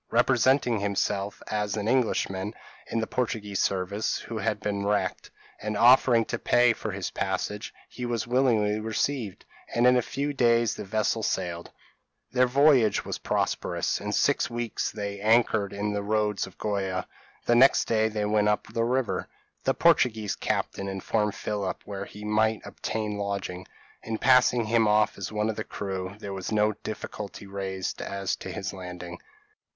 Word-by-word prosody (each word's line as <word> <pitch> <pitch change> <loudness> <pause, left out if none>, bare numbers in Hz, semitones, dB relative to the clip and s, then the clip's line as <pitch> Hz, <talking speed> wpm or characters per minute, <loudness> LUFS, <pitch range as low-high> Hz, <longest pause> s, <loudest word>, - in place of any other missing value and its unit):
Representing 125 0 +3
himself 100 0 -1
as 105 0 -2
am 105 0 -2
Englishman 110 -5 0 0.3
in - - -3
the - - 0
Portuguese 110 -5 -2
service, 100 +3 0
who 115 -2 -6
had 105 +1 -1
been 100 -1 -2
wrecked, 105 0 -1 0.3
and 105 0 -2
offering 120 -1 +6
to - - -3
pay 120 -1 +4
for 110 - -5
his 100 -2 -4
passage, 95 +2 -3 0.2
he 125 - -8
was 120 -2 -1
willingly 120 -4 +2
received, 110 0 -2 0.3
and 120 +1 +3
in 125 0 +6
a 125 - +4
few 140 +4 -3
days 120 -3 +3
the - - -6
vessel 110 +2 0
sailed. 85 -4 -2 0.6
Their 125 0 +3
voyage 130 -5 +4
was - - -4
prosperous; - - -1
in - - -3
six - - +2
weeks 120 -1 -2
they 100 -1 -5
anchored 110 -2 +3
in 105 +1 -2
the 100 - -1
roads 105 -1 0
of 95 - -15
Goa; 95 -3 -2 0.4
the 120 - +3
next 130 +3 +6
day 110 -1 +2
they 105 -1 -2
went 105 0 +2
up 105 - -1
the 115 - +1
river. 125 0 0 0.4
The - - +2
Portuguese 110 -4 +3
captain 100 - -2
informed 100 +2 -1
Philip 100 -3 -3
where 100 -1 -5
he 105 +1 -10
might 110 +1 +2
obtain 105 -2 -3
lodging; 100 -2 -4 0.3
and 110 -1 -4
passing 125 -2 +4
him 115 0 +3
off 105 +1 +2
as - - -4
one 105 0 0
of 110 - -9
his 110 - -4
crew, 95 -1 -4
there 100 -2 -6
was 95 +1 -5
no 105 0 +3
difficulty 105 -1 -7
raised 95 -1 -4
as 100 -1 -2
to - - -7
his 100 -3 -4
landing. 90 -2 -8
105 Hz, 165 wpm, -27 LUFS, 100-115 Hz, 0.6 s, offering